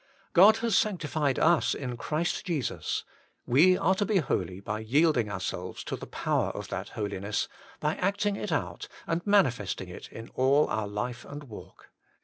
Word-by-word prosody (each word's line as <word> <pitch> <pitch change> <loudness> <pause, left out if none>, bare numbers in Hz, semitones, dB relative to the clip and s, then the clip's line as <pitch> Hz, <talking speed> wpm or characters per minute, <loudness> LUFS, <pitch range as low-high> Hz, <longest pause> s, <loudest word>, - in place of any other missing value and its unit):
God 205 +5 +8
has 225 -4 +2
sanctified 155 -9 +1
us 170 +1 +3
in 125 -3 -4
Christ 155 - -2
Jesus: 160 - -2 0.4
we 170 +9 +5
are 190 - +3
to 190 - 0
be 205 -1 +2
holy 95 - -1
by 105 +2 -4
yielding 125 0 +2
ourselves 95 -2 -4
to - - -3
the - - -9
power - - 0
of - - -6
that - - -4
holiness, 100 -1 -2 0.3
by 150 +1 0
acting 200 +2 0
it - - -4
out, - - -2 0.2
and 165 +1 -1
manifesting 130 - +2
it - - -10
in 115 0 -9
all 135 +3 +3
our 110 -2 -1
life 115 +4 -4
and 145 +1 -8
walk. 115 -7 -12
145 Hz, 165 wpm, -28 LUFS, 110-180 Hz, 0.4 s, God